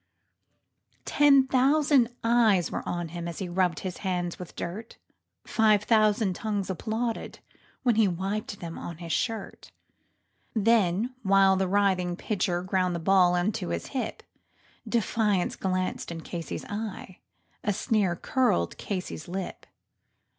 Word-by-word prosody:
Ten 280 -2 +5
thousand 270 -1 +3
eyes 225 -7 +3
were - - -2
on 175 -1 -3
him 170 +1 -5
as 170 - -6
he 190 - -3
rubbed 180 -1 0
his 185 -2 -5
hands 180 -3 -2
with 180 - -9
dirt, 210 +7 -6 0.5
Five 215 -2 +3
thousand 215 -3 +3
tongues 200 -1 -2
applauded 225 +5 -3 0.5
as 240 -3 +4
he 220 -2 +4
wiped 195 +3 -3
them 170 -1 -6
on 170 -2 -7
his 170 -1 -7
shirt; 225 0 -3 0.8
And 220 0 +2
while 195 -2 +5
the 190 0 0
writhing 185 -2 +1
pitcher 180 -3 -1
ground 185 -1 0
the - - -2
ball 180 +1 +4
into 175 - -1
his 85 0 -3
hip 260 - -4 0.7
Defiance 215 -4 +1
gleamed 185 -1 -1
from 165 -1 -6
Casey's 170 0 -6
eye 205 -3 -6 0.4
a 210 - +1
sneer 200 -3 +1
curled 170 - 0
Casey's 185 -5 -5
lip. 185 +1 -6
195 Hz, 130 wpm, -27 LUFS, 175-220 Hz, 0.8 s, Ten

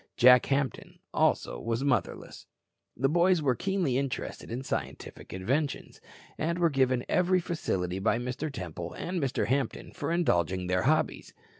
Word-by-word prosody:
Jack 125 0 +7
Hampton 140 -1 -2 0.2
also - - +1
was 115 - -2
motherless. 130 -6 -2 0.5
The 135 - +2
boys 175 +4 +3
were 140 -4 +2
keenly 175 - 0
interested 135 -4 -4
in 125 +3 -4
scientific - - -5
inventions, 130 +11 -2 0.4
and 170 +2 0
were 170 -2 +3
given 130 -2 +1
every 180 +1 +3
facility 95 - -2
by 110 +3 +2
Mr. 125 +5 -3
Temple 90 - -6
and 180 -1 -3
Mr. 135 -2 0
Hampton 135 -1 -1
for 145 - -4
indulging 95 - +1
their 90 0 +1
hobbies. 155 +4 0
135 Hz, 145 wpm, -29 LUFS, 115-160 Hz, 0.5 s, Jack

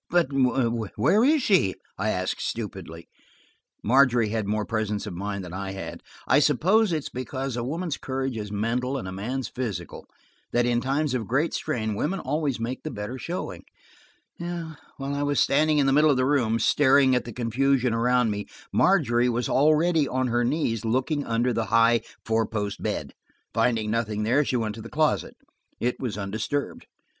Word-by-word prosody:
"But 175 -5 +2
where 125 - +2
is 295 0 +4
she?" 175 - +3 0.2
I 105 +3 -1
asked 95 -2 -2
stupidly. 95 -7 -5 0.8
Margery 120 -2 +4
had 110 -2 -2
more 105 0 0
presence 110 -2 -2
of - - -6
mind 100 +1 -4
than 90 - -9
I 95 0 -4
had; 95 - -7 0.3
I - - +5
suppose 180 - +3
it 165 - +1
is - - -6
because 130 0 -4
woman's 150 +7 -3
courage 130 -1 -3
is 105 -2 -5
mental 120 +6 -1
and 95 -7 -5
man's 125 +7 -3
physical, 120 -8 -5 0.5
that 120 0 +3
in 120 0 +1
times 140 +2 0
of 115 -5 -2
great 140 - +1
strain 110 -8 -2
women 165 - -1
always 150 -7 -1
make 120 +3 -3
the 155 - -5
better 105 +2 -6
showing. 175 +6 -5 0.8
While 170 -2 -5 0.4
I 140 - -2
was 145 -1 +1
standing 150 +2 +3
in 145 - +3
the 135 - +3
middle 150 +2 +5
of 140 - +3
the 130 - +2
room, 125 -5 +2
staring 135 +2 +4
at 125 - +1
the 120 - -6
confusion 125 +2 +1
around 120 0 +2
me, 105 0 -4 0.3
Margery 120 +2 +3
was 120 0 -1
already 155 +2 +3
on 130 -1 -1
her 120 +1 +1
knees, 120 -4 0
looking 130 +6 0
under 120 +2 +1
the 115 0 -1
high, 115 +2 +4 0.2
four 110 -1 +1
post 105 -2 -3
bed. - - -3 0.4
Finding 110 -3 +1
nothing 110 -2 -1
there 125 +7 +3
she 130 - -2
went 110 -2 -2
to 110 - -9
the 115 - -9
closet. 155 0 0 0.4
It 125 +1 -1
was 120 -6 -3
undisturbed. 110 +8 -3
125 Hz, 175 wpm, -25 LUFS, 110-140 Hz, 0.8 s, I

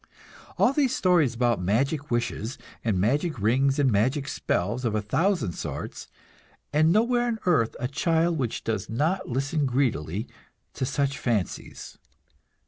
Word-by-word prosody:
All - - +4
these 275 -3 +2
stories 170 -9 +3
about 120 -4 +1
magic 135 - 0
wishes 120 0 -2 0.3
and 105 -5 +1
magic 145 - +1
rings 135 +7 +2
and 140 -3 +3
magic 130 +7 +1
spells 110 0 -1
of 115 -3 0
a 105 - +1
thousand 160 - +1
sorts; - - -6 0.7
and 155 +2 +4
nowhere 240 +4 +2
on 235 -2 -1
earth 155 -11 +2
a 125 - -1
child 165 +3 +1
which 120 -4 -2
does 110 -4 -2
not 165 +10 0
listen 140 +3 0
greedily 110 - -1 0.5
to 130 - -2
such 140 +1 -1
fancies! 115 - -3
135 Hz, 140 wpm, -26 LUFS, 115-160 Hz, 0.7 s, All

